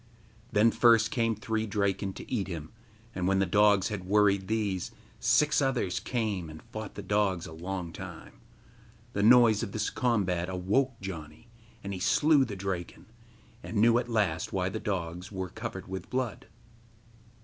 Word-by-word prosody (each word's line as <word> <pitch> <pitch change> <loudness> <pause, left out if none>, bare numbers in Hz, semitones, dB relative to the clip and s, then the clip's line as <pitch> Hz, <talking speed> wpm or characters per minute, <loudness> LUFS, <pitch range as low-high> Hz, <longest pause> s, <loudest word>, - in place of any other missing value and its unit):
Then 110 +2 +4
first 115 -2 +4
came 115 -2 +1
three 110 0 -2
Draken 100 -1 -1
to - - -10
eat 105 -6 -1
him, 80 -4 -6 0.4
and 90 -1 -2
when 95 0 +3
the 95 - +3
dogs 100 +1 +4
had 105 -4 -4
worried 100 -1 +3
these, 105 -4 -1 0.3
six 150 0 +3
others 125 -9 0
came 105 -9 -2
and 80 0 -10
fought 110 -2 -8
the 100 - -6
dogs 95 -3 0
a - - -9
long 85 0 -5
time. - - -10 0.7
The 100 - -1
noise 115 -1 +6
of 110 -4 -4
this 105 -1 -1
combat 95 -8 0
awoke 105 +8 0
Janni, 85 +2 -8 0.3
and 100 0 -4
he 95 - -5
slew 145 - +4
the 105 -4 -6
Draken, 95 -2 -5 0.6
and 110 - -5
knew 115 +3 +5
at 120 0 -5
last 100 -9 0
why 95 -1 0
the 110 - -4
dogs 90 -3 -4
were 95 -2 -4
covered - - -6
with 95 0 -6
blood. 125 -3 -3
100 Hz, 165 wpm, -29 LUFS, 95-115 Hz, 0.7 s, noise